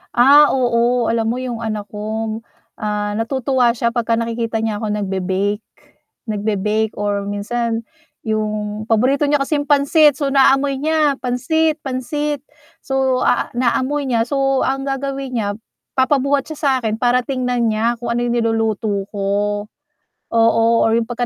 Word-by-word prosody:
Ah. 285 +5 +7
Oo, 240 -1 +1
alam 225 -1 0
mo 235 +2 -1
'yung 250 -3 -4
anak 215 -2 -3
ko, 220 +1 -4 0.4
ah, 210 -1 -2
natutuwa 250 +1 +1
siya 235 0 0
'pag 235 -2 -1
ka 230 - +2
nakikita 230 -1 -2
niya 220 -2 -2
ako 220 - -2
nag-be-bake, 200 +1 -1 0.6
nag-be-bake 210 0 -1
or 205 -1 -1
minsan 230 +3 -2 0.4
'yung 215 -1 -2
paborito 255 +6 +2
niya 290 0 +2
kasing 290 +1 0
pansit, 290 0 +4
so, 285 - 0
naamoy 275 0 +4
niya, 305 -1 +2
pansit, 310 +6 0
pansit. 285 +2 -3 0.4
So, 265 -1 0
ah, - - +2
naamoy 260 +4 0
niya. 230 -2 +1
So, 270 0 +1
ang 270 0 -1
gagawin 275 -1 -3
niya 215 -3 -1 0.5
papabuhat 275 +1 +2
siya - - -12
sa 270 -4 +1
'kin 220 0 -1
para 250 0 +3
tingnan 250 -3 0
niya 230 +2 +1
kung 235 0 -3
ano 240 - -1
'yung 240 0 0
niluluto 220 -3 0
ko. 205 +1 -1 0.7
Oo, 230 0 +3 0.2
or 225 - +2
'yung 230 - +1
'pag 245 0 -2
235 Hz, 150 wpm, -19 LUFS, 215-270 Hz, 0.7 s, Ah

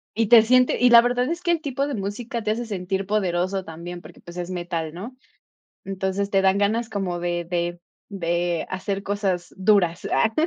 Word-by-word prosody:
Y 225 -1 +2
te 235 -2 +8
siente 250 +2 +3
y 250 -1 +5
la 235 -1 +10
verdad 245 +1 0
es 340 +1 -3
que 345 - 0
el 330 - 0
tipo 275 -2 -2
de 285 - -3
música 220 +3 -4
te 215 - -1
hace 235 +2 -2
sentir 190 -1 -3
poderoso 190 -2 0
también, 170 +2 -8
porque, - - -15
pues 175 +1 -12
es 175 +1 -4
metal, 170 -3 -3
¿no? 230 +9 -8 0.7
Entonces 195 +1 -2
te 195 -1 +2
dan 190 +1 +3
ganas 220 +3 0
como 190 -4 -3
de 175 -1 -2
de 175 0 -2 0.3
de 175 -3 -1
hacer 195 +1 -3
cosas 195 -3 -2
duras, 185 -4 +2
ah. 225 0 +2
195 Hz, 195 wpm, -23 LUFS, 175-225 Hz, 0.7 s, la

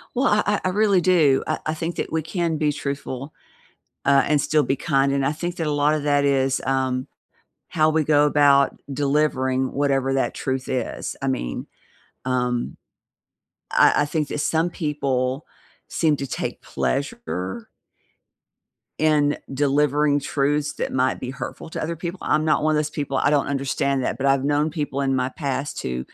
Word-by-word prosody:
Well, 260 +3 +2
I 210 0 +3
I 205 -1 +1
I - - +2
really 200 -1 +3
do. 160 -7 +4
I 155 - -1
I 155 - 0
think 165 +2 -4
that - - -3
we 160 -1 0
can 165 0 -1
be 150 -1 +1
truthful, 140 0 -5 0.7
uh, 140 -1 +5
and 150 -1 +2
still 155 -1 +2
be 135 - 0
kind 140 -1 +1
and 140 -1 0
I 140 - +2
think 175 +3 -4
that 165 - -1
a 150 - 0
lotta 145 +1 +2
that 145 -1 +2
is, 135 -1 +2
um, 130 -1 0 0.6
how 155 -1 +3
we 155 0 +2
go 150 0 +4
about 145 -2 +4
delivering 135 -2 +1
whatever 135 -1 +1
that 135 - 0
truth 130 0 -3
is. 130 -3 -3
I 135 - -2
mean, 130 - -3 0.6
um, 125 -1 -1 0.9
I - - +4
I - - +1
think 150 -1 -1
that - - -4
some 165 +3 +1
people 140 -4 -2 0.4
seem 155 -3 +1
to 140 - -4
take - - -4
pleasure 135 - -3 1.3
in 150 -2 +2 0.2
delivering 145 +1 +2
truths 145 +1 0
that - - -4
might 130 0 +1
be 125 - -4
hurtful 160 +4 -7
to - - -4
other 165 +2 -2
people; 170 +3 -5
I'm 155 +1 +1
not 155 -1 +2
one 155 0 +3
of - - +2
those 150 0 -1
people, 145 -3 -3
I 140 - +2
don't 145 -1 +2
understand 140 0 -1
that, - - -1
but 135 - -2
I've 135 -1 +3
known 145 +2 +1
people 145 -3 -3
in 135 -1 +1
my 130 -1 0
past 140 0 -3
who 65 0 -3
145 Hz, 180 wpm, -23 LUFS, 135-155 Hz, 1.3 s, uh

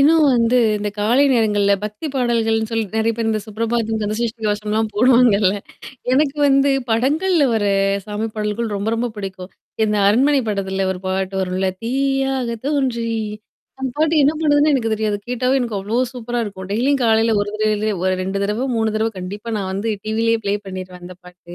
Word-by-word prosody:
இன்னும் 310 +2 +5
வந்து 235 +1 +3 0.2
இந்தக் 205 0 -4
காலை 235 +7 +3
நேரங்கள்ல 210 -4 +2
பக்திப் 215 +8 -5
பாடல்கள்ன்னு 225 -3 +1
சொல்லி 225 -1 0
நிறைய 220 +1 +2
பேர் 230 -1 -1
இந்தச் 215 -1 -2
சுப்ரபாதம், 225 +1 -1
கந்த 210 +1 -1
சஷ்டி 235 -1 -3
கவசம் 210 0 -2
எல்லாம் 220 +1 +1
போடுவாங்க 245 0 +5
இல்ல. 190 -1 +4 0.6
எனக்கு 280 +2 +2
வந்து 275 0 +4 0.2
படங்கள்ல 295 +9 +2
வர்ற 205 -2 +1 0.4
சாமி 210 +1 -3
பாடல்கள் 215 +1 -2
ரொம்ப 200 +2 -2
ரொம்பப் 235 -1 -2
பிடிக்கும். 190 -2 -7 0.3
இந்த 210 -1 0
அரண்மனை 270 +7 +3
படத்தில 195 -2 -1
ஒரு 180 - -8
பாட்டு 190 +1 -2
வரும்ல 185 +1 -1
தீயாக 270 +1 0 0.2
தோன்றி 265 -5 0 0.7
அந்தப் 265 -1 -4
பாட்டு 315 +1 +2
என்ன 280 +2 +4
பண்றதுன்னே 295 -1 +3
எனக்குத் 225 -5 +1
தெரியாது. 215 -1 -1
கேட்டாவே 250 +1 0
எனக்கு 230 -4 -2
அவ்வளோ 220 +6 0
சூப்பரா 240 0 -4
இருக்கும். 190 -3 -7
டெய்லியும் 270 +5 +1
காலையில 225 0 +3
1 205 - -2
தடவையோ, 215 0 +1 0.2
இல்ல 185 +1 0
2 190 +1 -2
தடவ 210 +6 -1
3 220 -1 +1
தடவ 220 +1 +1
கண்டிப்பா 200 +5 -7
நான் 190 -2 -3
வந்து 200 +4 -2 0.2
டிவிலேயே 225 +1 +1
ப்லே 200 0 +1
பண்ணிருவேன் 185 -1 -8
அந்த 180 +1 -9
பாட்டு. 175 -1 -13
225 Hz, 175 wpm, -20 LUFS, 205-250 Hz, 0.7 s, இன்னும்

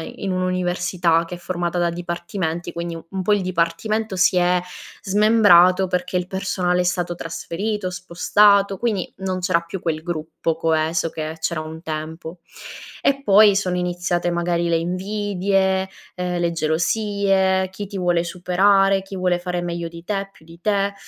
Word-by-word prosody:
in 195 -2 -4
un'università, 180 -2 0
che 175 +1 -7
è - - -10
formata 175 0 -3
da 175 -1 +2
dipartimenti, 175 0 -4
quindi 170 0 -5
un 190 -1 -3
po' 210 +3 +2
il 205 - +1
dipartimento 185 +4 -1
si 185 0 +3
è 180 0 +3 0.4
smembrato, 195 -3 +5
perché 180 0 -2
il 180 0 -2
personale 185 -2 -1
è - - +1
stato 175 -1 -1
trasferito, 185 +4 -4
spostato, 195 +3 +3
quindi 215 -7 -2
non 190 -1 -3
c'era 180 -2 +2
più 170 +2 -7
quel 155 -2 -2
gruppo 165 -1 -3
coeso 160 0 0
che 155 0 -5
c'era 160 0 -1
un 160 +1 -8
tempo. 160 +2 -6 0.6
E 275 0 +1
poi, 205 -1 +6
sono 185 -2 -1
iniziate 175 0 -1
magari 170 0 0
le 165 - +3
invidie, 190 +1 0 0.3
ehm, 180 -1 -2
le 170 -1 +1
gelosie, 190 +3 +1
chi 200 +1 -6
ti 200 - -7
vuole 175 -2 +1
superare, 195 +2 +2
chi 195 0 -8
vuole 180 -1 +1
fare 180 0 -3
meglio 170 -1 -4
di 170 0 -11
te, 195 -1 -2
più 160 - -21
di 165 +1 -15
te. 200 -1 +1
180 Hz, 160 wpm, -21 LUFS, 170-195 Hz, 0.6 s, poi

